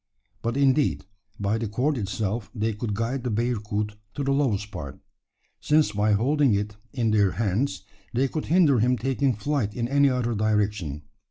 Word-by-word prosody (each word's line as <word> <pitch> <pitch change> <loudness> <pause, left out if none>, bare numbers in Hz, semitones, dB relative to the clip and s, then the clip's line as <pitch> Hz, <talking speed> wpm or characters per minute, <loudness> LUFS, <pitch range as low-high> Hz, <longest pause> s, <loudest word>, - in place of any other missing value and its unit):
But, 115 +2 -2
indeed, 140 -3 +2 0.3
by 105 +2 0
the 115 - -2
cord 130 +8 0
itself 105 0 -2
they 110 0 0
could 105 0 -3
guide 120 +4 -2
the 125 - -1
bearcoot 105 -2 -1 0.2
to 145 - -2
the 140 - 0
lowest 110 -8 0
part 70 -3 -7 0.6
since 150 -6 +3
by 105 +1 +2
holding 135 +2 +3
it 105 +1 -2 0.2
in 115 -4 0
their 100 -3 +3
hands, 105 -1 -1 0.3
they 130 +3 +1
could 155 +3 -4
hinder 160 -7 +4
him 125 +3 +2
taking 135 0 0
flight 110 -2 -1
in 120 -1 -1
any 140 +1 +4
other 125 -2 0
direction. 105 -8 0
115 Hz, 170 wpm, -25 LUFS, 105-135 Hz, 0.6 s, hinder